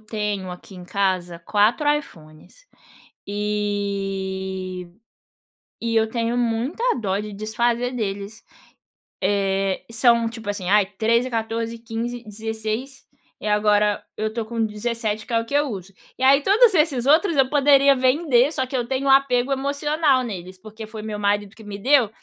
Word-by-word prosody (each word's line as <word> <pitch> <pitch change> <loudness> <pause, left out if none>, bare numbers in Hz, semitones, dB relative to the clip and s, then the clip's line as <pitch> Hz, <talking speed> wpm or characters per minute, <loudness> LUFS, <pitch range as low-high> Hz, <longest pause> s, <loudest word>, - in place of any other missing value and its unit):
tenho 210 -3 -3
aqui 180 +2 -11
em 180 - -10
casa 185 -2 -1
4 210 - +1
iPhones 170 - -8 0.6
e 195 -3 -3 0.9
e 230 -1 -1
eu 220 0 +3
tenho 235 +1 -1
muita 240 - -1 0.2
dó 195 -3 -1
de 210 0 -5
desfazer 235 +4 -1
deles, 200 -1 -4 0.8
eh, 195 -1 0
são 235 0 +3
tipo 225 -2 -9
assim 190 -3 -4
ai 205 -1 +5
13, 230 +5 +1
14, 230 0 -3
15, 235 +1 -5
16, 220 +4 -5 0.4
e - - -6
agora 210 0 +2
eu 215 - -1
estou 220 0 -4
com 230 0 -1
17 220 0 -3
que - - -8
é 230 - +3
o 230 - -5
que - - -11
eu 290 +1 +3
uso. 195 -4 -7 0.3
E - - -6
aí 275 +1 +6
todos 435 +3 +5
esses 300 -7 +2
outros 320 +4 +4
eu 270 -2 +4
poderia 280 -1 +5
vender 260 +1 +3
só 260 -5 -1
que 260 - -3
eu 240 -2 -1
tenho 270 +1 -1
apego 270 -1 +3
emocional 285 0 +1
neles, 185 -4 -7
porque 215 +2 -10
foi 215 0 -8
meu 215 -1 -5
marido 205 0 0
que 220 - -13
me 205 -1 -6
deu, 255 +1 +4
220 Hz, 155 wpm, -22 LUFS, 205-255 Hz, 0.9 s, aí